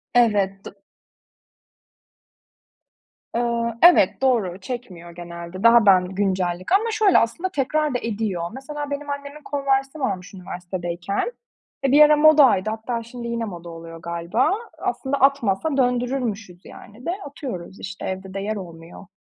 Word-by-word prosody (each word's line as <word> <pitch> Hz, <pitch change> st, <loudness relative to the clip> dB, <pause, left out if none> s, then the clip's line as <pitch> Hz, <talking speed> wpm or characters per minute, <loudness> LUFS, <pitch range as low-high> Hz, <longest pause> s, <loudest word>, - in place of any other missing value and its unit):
Evet, 200 Hz, -5 st, +2 dB
do -, -, -7 dB, 2.6 s
Iıı, 235 Hz, -1 st, -1 dB
evet, 345 Hz, -, +6 dB
doğru, 220 Hz, -9 st, +1 dB
çekmiyor 185 Hz, -8 st, -7 dB
genelde. 170 Hz, +2 st, -8 dB
Daha 230 Hz, -1 st, +7 dB
ben 185 Hz, -2 st, +6 dB
güncellik. 185 Hz, -, -1 dB
Ama 440 Hz, +4 st, +3 dB
şöyle 430 Hz, -3 st, +4 dB
aslında 335 Hz, +12 st, 0 dB
tekrar 300 Hz, 0 st, 0 dB
da 245 Hz, -, 0 dB
ediyor. 205 Hz, -6 st, -2 dB
Mesela 290 Hz, +2 st, -6 dB
benim 285 Hz, 0 st, -4 dB
annemin 285 Hz, +1 st, -6 dB
Converse'i 275 Hz, +1 st, -1 dB
varmış 195 Hz, -7 st, -3 dB
üniversitedeyken. 180 Hz, -, -4 dB, 0.5 s
E, 270 Hz, -, +2 dB
bir 295 Hz, +2 st, +8 dB
ara 300 Hz, 0 st, +7 dB
modaydı 280 Hz, -10 st, +5 dB
hatta 230 Hz, +2 st, -3 dB
şimdi 235 Hz, +1 st, -8 dB
yine 235 Hz, -1 st, -2 dB
moda 175 Hz, -4 st, -8 dB
oluyor 165 Hz, 0 st, -10 dB
galiba. 170 Hz, +7 st, 0 dB, 0.3 s
Aslında 270 Hz, +1 st, -2 dB
atmasa 275 Hz, 0 st, +2 dB
döndürürmüşüz, 245 Hz, -7 st, -1 dB
yani, 230 Hz, +7 st, -13 dB
de -, -, +1 dB
atıyoruz, 240 Hz, -, -7 dB
işte, 195 Hz, 0 st, -7 dB
evde 190 Hz, 0 st, -5 dB
de 195 Hz, -, -3 dB
yer 215 Hz, +2 st, -2 dB
olmuyor. 170 Hz, 0 st, -10 dB
225 Hz, 135 wpm, -22 LUFS, 185-270 Hz, 2.6 s, bir